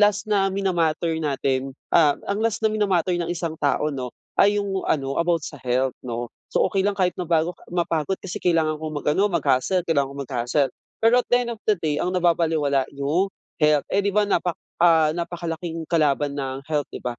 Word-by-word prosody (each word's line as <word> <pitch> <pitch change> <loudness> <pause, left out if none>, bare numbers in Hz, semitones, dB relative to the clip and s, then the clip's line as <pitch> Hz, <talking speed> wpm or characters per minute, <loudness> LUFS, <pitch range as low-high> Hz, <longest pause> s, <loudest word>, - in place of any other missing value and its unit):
last 205 -1 +3
na 195 -2 +3
mina-matter 170 -4 0
natin, 135 -2 -1 0.2
ah, 150 -4 +5
ang 200 - 0
last 225 -1 0
na 215 - +4
minamatter 190 -4 +1
ng 170 - -2
isang 165 -2 -4
tao, 150 +1 +1
'no, 130 -3 -5 0.3
ay 205 +1 +4
yung 195 -2 -2
ano 135 -2 0
about 170 -2 +1
sa 145 - -7
health 125 +1 0
'no. 120 -1 -4 0.2
So - - +1
okey 195 0 +1
lang 205 - +1
kahit 185 -2 0
mabago 170 0 0 0.2
mapagod, 170 0 0
kasi 190 - -5
kailangan 160 -3 +1
kong 155 -1 -5
mag-ano, 190 +8 +2
mag-hustle, 170 +1 +1
kailangan 145 -5 +1
kong 140 - -4
mag-hustle. 130 +2 0 0.3
Pero 235 +2 +5
at - - 0
the 245 - +3
end 235 - -4
of 230 -2 -7
the 215 - +4
day, 150 -2 0
ang 180 +1 -1
nababalewala 160 -6 +2
yung 145 +8 +1 0.3
health. 150 -2 +3
Eh 200 - +1
'di 200 0 0
ba, 210 - +4
napak 180 -3 0 0.2
ah, 165 -3 +5
napakalaking 170 0 -4
kalaban 145 -3 +2
ng 135 0 -4
health, 145 -2 0
'di - - -7
ba. 120 -1 -4
165 Hz, 195 wpm, -23 LUFS, 145-185 Hz, 0.3 s, ah